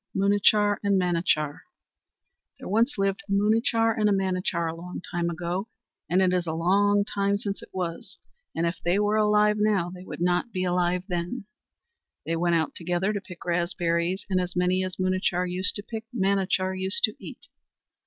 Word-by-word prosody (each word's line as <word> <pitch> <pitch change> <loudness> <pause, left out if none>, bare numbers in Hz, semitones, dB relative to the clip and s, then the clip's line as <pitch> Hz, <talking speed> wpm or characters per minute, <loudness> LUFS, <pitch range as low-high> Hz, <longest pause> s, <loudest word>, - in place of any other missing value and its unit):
Munachar 205 +1 +3
and 200 -1 +3
Manachar 170 -4 0 1.0
There - - -9
once 230 +7 +1
lived 195 0 0
a 200 - -11
Munachar 225 +3 +2
and 210 -1 +2
a - - +2
Manachar, 185 -3 0
a 160 - -3
long 180 +2 -7
time 170 0 -1
ago, 175 +4 -3 0.4
and 185 +3 +3
it 185 -1 +2
is 180 -2 0
a 160 - -1
long 200 +5 +3
time 200 0 0
since 200 -1 -4
it - - -12
was, 175 -3 -5 0.4
and 165 - 0
if 170 +1 -2
they 175 +3 +2
were 210 +1 +2
alive 210 0 +3
now 205 -5 +1
they 180 0 -10
would - - -8
not 180 +6 +1
be 185 -3 -2
alive 180 0 +1
then. 180 +5 -3 0.8
They 165 - -1
went 170 +1 +1
out 160 -2 0
together 180 +4 -1
to 205 - -3
pick 180 -3 -12
raspberries, 175 +1 0
and 185 -2 +1
as 180 -1 -5
many 180 +1 +2
as 185 0 -4
Munachar 185 -1 0
used 185 +2 +1
to 205 - -3
pick 225 +1 -6
Manachar 190 -2 +1
used 190 +1 0
to 215 - +3
eat. - - -10
185 Hz, 185 wpm, -26 LUFS, 175-205 Hz, 1.0 s, Munachar